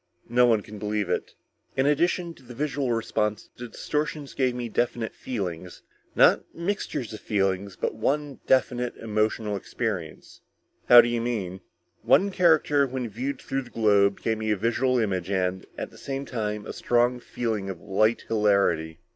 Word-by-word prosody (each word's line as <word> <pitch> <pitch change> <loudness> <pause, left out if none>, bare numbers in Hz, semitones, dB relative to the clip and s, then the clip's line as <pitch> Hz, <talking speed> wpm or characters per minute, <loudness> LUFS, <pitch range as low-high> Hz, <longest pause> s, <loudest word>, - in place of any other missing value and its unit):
No 125 +1 +5
one 110 -3 +3
can 105 -1 -10
believe 105 -2 -1
it."_ - - -2 0.4
"In 135 - +3
addition 170 +4 +1
to - - -20
the 120 -1 -12
visual 140 -1 -1
response, 110 -2 -1
the 120 - -7
distortions 150 +3 -3
gave 130 -2 +1
me 120 -1 -3
definite 115 0 -1
feelings. 90 -7 -5 0.3
Not - - +6
mixtures 170 - -3
of 110 - -7
feelings, 95 -1 -1
but - - -2
one 140 +5 -1
definite 125 -2 +1
emotional 110 -1 -1
experience." 95 -5 -5 0.5
"How 120 -1 +11
do - - -1
you 120 -1 -1
mean?" 100 -6 -3 0.4
"One 200 +1 +4
character 155 -6 +3
when 130 -2 -4
viewed 130 +6 -4
through 135 - -2
the 125 - -12
globe 100 -3 +3
gave 110 -1 -1
me 110 0 -2
a 105 - +2
visual 120 +5 +1
image 95 -6 -1
and, 95 -1 -1
at - - -5
the - - -15
same 135 0 -4
time, 105 -4 -3
a - - -6
strong 120 +1 +1
feeling 110 -5 -3
of 95 -3 -6
light 110 +5 +1
hilarity." 100 -7 +2
115 Hz, 165 wpm, -26 LUFS, 105-130 Hz, 0.5 s, How